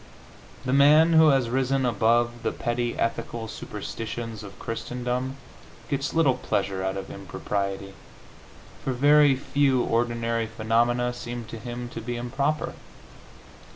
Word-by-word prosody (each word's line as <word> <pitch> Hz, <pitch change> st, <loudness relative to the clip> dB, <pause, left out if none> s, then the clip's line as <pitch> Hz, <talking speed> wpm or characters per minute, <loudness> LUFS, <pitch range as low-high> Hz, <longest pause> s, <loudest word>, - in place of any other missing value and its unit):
The 130 Hz, -, 0 dB
man 150 Hz, +4 st, +6 dB
who 160 Hz, -1 st, +7 dB
has 135 Hz, -5 st, +3 dB
risen 130 Hz, +1 st, +1 dB
above 120 Hz, 0 st, +2 dB
the -, -, 0 dB
petty 120 Hz, 0 st, -2 dB
ethical 115 Hz, 0 st, -2 dB
superstitions 115 Hz, 0 st, -6 dB
of 100 Hz, -2 st, -10 dB
Christendom 125 Hz, +3 st, -3 dB, 0.5 s
gets 140 Hz, 0 st, -2 dB
little 155 Hz, -5 st, +4 dB
pleasure 95 Hz, -5 st, -2 dB
out 95 Hz, 0 st, -1 dB
of 95 Hz, -, -6 dB
impropriety, 100 Hz, +1 st, -4 dB, 0.9 s
for 130 Hz, -, -1 dB
very 145 Hz, +2 st, +5 dB
few 135 Hz, -1 st, +2 dB
ordinary 115 Hz, -1 st, 0 dB
phenomena 120 Hz, +2 st, +1 dB
seem 120 Hz, -1 st, -6 dB
to 115 Hz, 0 st, -8 dB
him 120 Hz, +1 st, -6 dB
to 115 Hz, -, -7 dB
be 120 Hz, +2 st, -4 dB
improper. 135 Hz, +5 st, -1 dB
120 Hz, 125 wpm, -26 LUFS, 115-135 Hz, 0.9 s, who